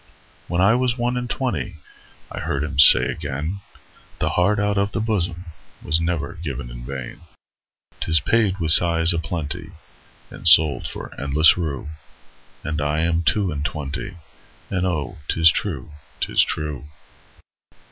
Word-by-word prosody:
When 85 +1 -1
I 100 +4 +4
was 125 0 0
one 120 +1 -2
and 125 -1 -4
twentyI 120 -9 -3 0.6
heard 70 +1 -4
him 70 -2 -5
say 75 - +11
again,'The 80 +6 -6
heart 100 +4 +1
out 105 -1 0
of 100 +1 -2
the - - -2
bosomWas 90 -6 -4
never 85 -3 -4
given 70 -6 -6
in - - -10
vain;'Tis 70 +4 -6
paid 105 +1 0
with 80 -4 +3
sighs 85 0 +5
a 85 - -2
plentyAnd 85 +2 -6 0.7
sold 80 -2 +5
for - - -8
endless 75 +3 +4
rue.'And 75 -1 -8
I 75 +2 -1
am 85 0 0
two 95 +2 0
and 75 -1 -5
twenty, 80 +5 -6 0.5
And 95 -1 -1
oh, 85 0 -4
'tis 80 0 +4
true, 80 -7 -4 0.3
'tis - - +2
true. 75 -3 -3
80 Hz, 130 wpm, -21 LUFS, 75-95 Hz, 0.7 s, say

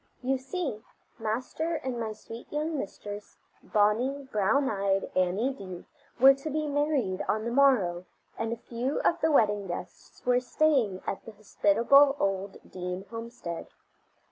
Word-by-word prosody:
You 265 +1 +1
see, 265 - -4 0.4
Master 255 +9 -2
and 260 -5 -3
my 225 -1 -2
sweet 225 +2 -10
young 305 +2 -1
mistress, 205 -4 -6 0.2
bonny, 245 +7 +1
brown 220 +7 +2
eyed 195 -3 0
Annie 190 +9 +1
Dee, 185 -7 -9 0.3
were 270 +2 +9
to 275 +3 -6
be 305 +1 -1
married 285 -10 0
on 215 +1 0
the 235 - -2
morrow, 225 -10 +3 0.3
and 225 0 -2
a 235 - -2
few 240 +4 -3
of 340 0 +1
the 320 - +3
wedding 210 -7 +3
guests 175 0 -8
were 250 0 +4
staying 250 -7 +1
at 195 - -3
the 225 - -10
hospitable 230 +7 +4
old 195 -2 -1
Dee 180 0 -5
homestead. 230 -7 -6
230 Hz, 145 wpm, -28 LUFS, 200-275 Hz, 0.4 s, were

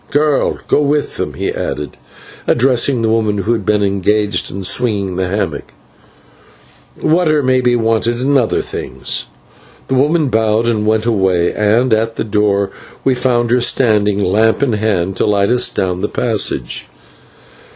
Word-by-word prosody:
Girl, 145 0 +1
go - - +2
with 145 0 0
them," - - -4
he - - -2
added, 75 0 -4 0.5
addressing 125 0 +2
the 110 - +1
woman 110 -2 +1
who 100 +3 -1
had 110 -3 -2
been 105 +1 +1
engaged 100 0 0
in 95 +1 -6
swinging 100 -3 0
the 95 0 -1
hammock, 90 -6 -3 1.3
"water 155 -2 +2
may 130 0 +2
be 125 -1 +2
wanted 115 +1 0
and 140 +3 +1
other 125 -5 +1
things." 65 -1 -5 0.6
The - - 0
woman 145 +3 +2
bowed 110 0 +1
and 105 -2 0
went 110 0 +1
away, 95 -6 +1
and 110 +4 +2
at 115 +1 0
the - - -2
door 105 -2 0 0.3
we 135 - +3
found 120 -2 0
her 125 0 +3
standing, 105 -5 +2
lamp 110 +7 +2
in 130 -5 +1
hand, 100 -4 -1
to - - +1
light 100 -1 +2
us 125 0 +2
down 90 -1 -2
the - - -1
passage. 115 -5 -2
110 Hz, 160 wpm, -15 LUFS, 100-125 Hz, 1.3 s, we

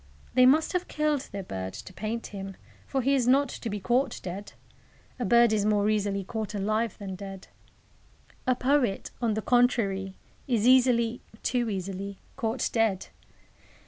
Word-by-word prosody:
They 255 0 +6
must 310 +7 +4
have 360 0 -1
killed 300 -2 -1
their 195 -1 -5
bird 95 - -5
to 185 - -9
paint 220 +4 -4
him, 195 -1 -6 0.3
for 270 -2 -1
he 275 +3 +3
is 255 -3 +2
not 275 +3 +4
to 230 - -5
be 205 0 -3
caught 245 +7 +1
dead. 190 +3 -6 0.7
A 245 - -1
bird 235 +2 +5
is 210 -2 +2
more 210 -1 +2
easily 200 -2 0
caught 220 +2 -4
alive 215 +2 0
than 195 -2 -6
dead. 195 0 -8 1.0
A 255 - +4
poet, 250 -5 +1
on 225 -3 +1
the 220 - -2
contrary, 200 -6 +2 0.3
is 235 -4 +1
easily 245 -2 +4 0.2
too 245 -3 0
easily 195 0 -4 0.2
caught 230 -1 -1
dead. 220 -5 +1
220 Hz, 160 wpm, -28 LUFS, 195-250 Hz, 1.0 s, They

